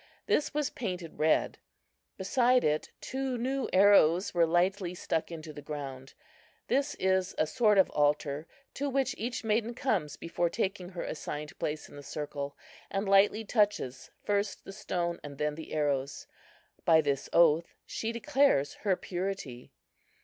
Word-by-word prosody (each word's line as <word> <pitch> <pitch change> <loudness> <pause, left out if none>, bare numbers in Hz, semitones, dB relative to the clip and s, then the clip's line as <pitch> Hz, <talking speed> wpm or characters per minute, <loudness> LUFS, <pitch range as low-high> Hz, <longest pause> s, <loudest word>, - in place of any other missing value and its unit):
This 300 - +1
was 295 -1 -1
painted 180 -7 -5
red. 155 +1 +2 0.6
Beside 250 +5 +3
it 150 0 0
two 265 -1 -3
new 265 +3 -1
arrows 185 -2 +5
were 170 -2 +4
lightly 180 +2 +1
stuck 165 -1 -2
into 160 -2 -7
the 145 - -9
ground. 135 -3 -7 0.5
This 280 +2 +1
is 190 -1 +1
a - - +3
sort 210 +4 +3
of 190 - +5
altar, 145 +1 +1 0.3
to 285 +1 -2
which 270 -1 +1
each 235 +2 -4
maiden 225 +2 0
comes 190 - -1
before 170 +1 -1
taking 190 -2 -2
her 180 -2 -5
assigned 150 -1 -5
place 150 0 -3
in - - -13
the - - -8
circle, 145 0 -5 0.3
and 195 +1 -2
lightly 200 +3 +4
touches 205 - 0
first 205 0 -1
the 195 - -8
stone 175 -4 -2
and 140 -1 -8
then 150 +1 0
the 160 +1 -9
arrows. 145 -2 -1 0.6
By 160 -1 +6
this 140 -2 -1
oath 165 -1 +4
she 225 - -3
declares 265 - +2
her 195 -3 +2
purity. 180 -10 -5
180 Hz, 150 wpm, -30 LUFS, 150-215 Hz, 0.6 s, By